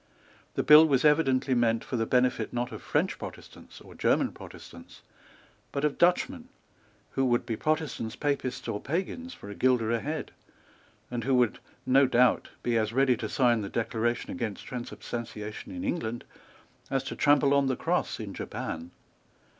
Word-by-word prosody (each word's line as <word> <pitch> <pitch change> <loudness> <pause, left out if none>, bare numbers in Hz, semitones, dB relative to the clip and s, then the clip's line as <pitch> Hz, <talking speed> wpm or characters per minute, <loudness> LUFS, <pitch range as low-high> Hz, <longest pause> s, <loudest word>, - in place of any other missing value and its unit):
The - - 0
bill 155 +1 +9
was 135 -1 +2
evidently 135 -3 +3
meant 115 -2 +2
for - - -4
the 115 -1 0
benefit, 125 -3 +1
not 120 +1 -2
of 110 - -7
French - - 0
Protestants - - -10
or - - -13
German - - +1
Protestants, 85 - -13 0.7
but 140 +1 -1
of 150 - -1
Dutchmen, 245 +9 +2 0.6
who 135 - 0
would 120 -1 +1
be 115 -2 -2
Protestants, 155 -6 -2
Papists 140 -3 -2
or 105 - -3
Pagans 195 - -3
for 100 - -10
a - - -5
guilder 125 -1 +2
a 115 - +1
head, 150 +4 -4 0.8
and 120 -1 -3
who 130 +2 +2
would, 125 -3 +2 0.3
no 135 +1 +5
doubt, 125 -1 +3
be 115 -1 +2
as 110 0 -1
ready 130 0 +4
to - - -4
sign 120 -4 +3
the 100 - -5
Declaration 115 +1 -1
against 115 -6 -4
Transubstantiation 120 - -6
in 270 -1 -6
England 120 - -2 0.7
as 135 -1 0
to - - -5
trample 145 -1 +4
on 140 -1 +3
the 130 - +1
Cross - - -1
in - - -6
Japan. 80 +2 -5
125 Hz, 165 wpm, -28 LUFS, 115-145 Hz, 0.8 s, bill